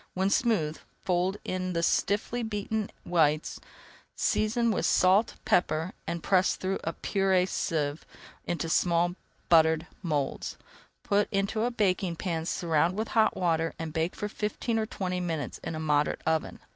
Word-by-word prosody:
When 190 Hz, +1 st, +1 dB
smooth, 180 Hz, -12 st, +1 dB, 0.3 s
fold 185 Hz, +2 st, +1 dB
in 185 Hz, 0 st, -2 dB
the 170 Hz, 0 st, 0 dB
stiffly 210 Hz, +7 st, +1 dB
beaten 215 Hz, -1 st, -2 dB, 0.2 s
whites, 155 Hz, -3 st, +1 dB, 0.6 s
season 230 Hz, +2 st, +1 dB
with -, -, 0 dB
salt 195 Hz, +5 st, +4 dB
and -, -, -26 dB
pepper, 165 Hz, 0 st, +1 dB
and 170 Hz, 0 st, -3 dB
press 190 Hz, -1 st, +3 dB
through 190 Hz, +1 st, -2 dB
a 165 Hz, -, -2 dB
purée 190 Hz, -1 st, +1 dB
sieve 150 Hz, -4 st, -1 dB, 0.4 s
into 170 Hz, -1 st, -2 dB
small 170 Hz, +1 st, +2 dB, 0.3 s
buttered 160 Hz, -1 st, +4 dB, 0.2 s
moulds. 150 Hz, -6 st, -2 dB, 0.5 s
Put 205 Hz, 0 st, +2 dB
into 200 Hz, +2 st, 0 dB
a -, -, +1 dB
baking 190 Hz, -6 st, 0 dB
pan, 165 Hz, -1 st, -3 dB
surround 170 Hz, +2 st, +1 dB
with 220 Hz, -, -2 dB
hot 220 Hz, -1 st, +3 dB
water, 165 Hz, -2 st, 0 dB
and 160 Hz, -1 st, -5 dB
bake 160 Hz, +2 st, -1 dB
for 210 Hz, -, -3 dB
fifteen 220 Hz, +2 st, -2 dB
or 220 Hz, -, -1 dB
twenty 185 Hz, -3 st, -3 dB
minutes 165 Hz, -5 st, -3 dB
in 165 Hz, -, -5 dB
a -, -, -4 dB
moderate 150 Hz, -2 st, +1 dB
oven. 160 Hz, 0 st, 0 dB
180 Hz, 155 wpm, -28 LUFS, 160-200 Hz, 0.6 s, salt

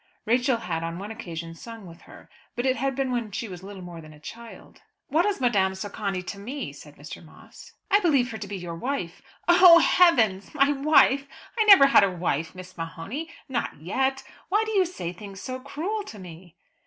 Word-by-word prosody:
Rachel 245 Hz, +2 st, +2 dB
had 175 Hz, -6 st, -4 dB
on 165 Hz, 0 st, -4 dB
one 200 Hz, +3 st, -7 dB
occasion 170 Hz, -7 st, -7 dB
sung 225 Hz, +4 st, -11 dB
with 170 Hz, -1 st, -13 dB
her, -, -, -14 dB, 0.3 s
but 240 Hz, -, -2 dB
it 260 Hz, -1 st, +2 dB
had 270 Hz, +2 st, -2 dB
been 270 Hz, -1 st, -1 dB
when 235 Hz, -3 st, -2 dB
she 215 Hz, +3 st, -5 dB
was 180 Hz, -3 st, -9 dB
little 195 Hz, -1 st, -10 dB
more 175 Hz, -2 st, -9 dB
than 155 Hz, -1 st, -13 dB
a 150 Hz, -, -16 dB
child. 230 Hz, +8 st, -12 dB, 0.3 s
"What 335 Hz, +6 st, +2 dB
is 410 Hz, -, -1 dB
Madame 200 Hz, -7 st, +2 dB
Socani 200 Hz, -1 st, -4 dB
to 200 Hz, +2 st, -7 dB
me?" 260 Hz, +8 st, -6 dB
said -, -, -14 dB
Mr. -, -, -10 dB
Moss. -, -, -16 dB, 0.2 s
"I 405 Hz, -, +6 dB
believe 280 Hz, -10 st, +2 dB
her 220 Hz, -, -6 dB
to 200 Hz, -, -6 dB
be 200 Hz, 0 st, -5 dB
your 175 Hz, -2 st, -6 dB
wife." 175 Hz, -2 st, -4 dB, 0.3 s
"Oh, 350 Hz, -1 st, +8 dB
heavens! 245 Hz, -, +3 dB
My 280 Hz, -1 st, +4 dB
wife! 280 Hz, -1 st, +4 dB, 0.3 s
I 445 Hz, -2 st, +2 dB
never 395 Hz, -9 st, +9 dB
had 275 Hz, -, +6 dB
a 200 Hz, -, +3 dB
wife, 165 Hz, -2 st, -2 dB
Miss 185 Hz, 0 st, -10 dB
O'Mahony; 180 Hz, -, -6 dB, 0.2 s
not 265 Hz, -, -3 dB
yet! 265 Hz, -, -1 dB, 0.3 s
Why 420 Hz, +3 st, +2 dB
do 440 Hz, -, -4 dB
you 385 Hz, -4 st, +3 dB
say 180 Hz, -, -6 dB
things 195 Hz, 0 st, -10 dB
so 255 Hz, +3 st, -6 dB
cruel 325 Hz, +11 st, -4 dB
to 220 Hz, -, -10 dB
me?" 175 Hz, -2 st, -12 dB
225 Hz, 205 wpm, -25 LUFS, 180-275 Hz, 0.3 s, never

